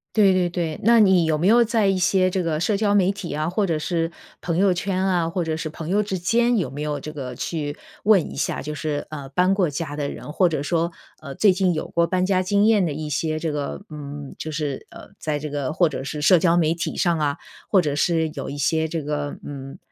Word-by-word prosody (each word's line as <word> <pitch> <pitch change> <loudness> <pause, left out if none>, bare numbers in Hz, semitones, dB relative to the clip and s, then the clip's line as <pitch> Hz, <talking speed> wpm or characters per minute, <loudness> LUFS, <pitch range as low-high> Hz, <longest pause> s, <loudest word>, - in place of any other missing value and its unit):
对 200 -3 +5
对 180 -1 +1
对。 170 -3 -3
那 230 +2 +6
你 190 -4 +5
有 160 -1 +1
没 175 - +1
有 235 +3 +6
在 225 -3 +1
一 195 - +2
些 185 +1 +3
这 185 0 -1
个 160 -2 -1
社 200 +6 +1
交 205 0 +1
媒 195 -2 +4
体 195 -4 -6
啊， 155 +2 -1
或 200 +3 0
者 165 -4 -1
是 165 +1 -1 0.3
朋 170 -2 -2
友 190 0 +4
圈 185 +1 -2
啊， 175 -3 +1
或 175 +1 -1
者 160 -1 -1
是 160 0 -4
朋 155 0 -8
友 205 +3 +2
之 195 -3 -3
间 235 +7 +2
有 185 - -1
没 145 +2 -7
有 150 -1 -2
这 155 +2 -8
个 130 -4 -6
去 145 +2 -4 0.3
问 205 -4 +4
一 - - -8
下， - - -2
就 150 +1 -5
是， 150 -1 -3
呃， 145 -3 -7
搬 180 +7 +2
过 190 -4 +2
家 145 0 -4
的 145 -1 -2
人， 150 - -8
或 180 +1 +3
者 155 -4 -2
说， 170 +3 0 0.3
呃， 140 -2 -7
最 205 -3 +4
近 185 -1 +1
有 155 - -3
过 170 0 +1
搬 185 0 +1
家 185 -1 +2
经 200 +2 +2
验 215 -4 +4
的 160 - -1
一 150 +1 -5
些 155 +1 -1
这 160 -1 -2
个 145 +5 -4
嗯， 145 -2 -8
就 155 - -5
是 150 -3 -3
呃， - - -12
在 150 -1 -2
这 150 +1 -5
个 140 -2 -2
或 170 +2 +3
者 145 - -5
是 150 +2 -5
社 175 +4 +6
交 170 0 +3
媒 160 -2 +3
体 170 +2 -4
上 170 -3 +2
啊， 145 -2 0 0.3
或 190 -3 +5
者 145 -3 -1
是 160 +1 +1
有 140 -4 -5
一 145 - -6
些 160 +3 +1
这 165 0 -2
个 145 0 -3
嗯， 135 -1 -8
165 Hz, 275 characters per minute, -23 LUFS, 150-185 Hz, 0.3 s, 那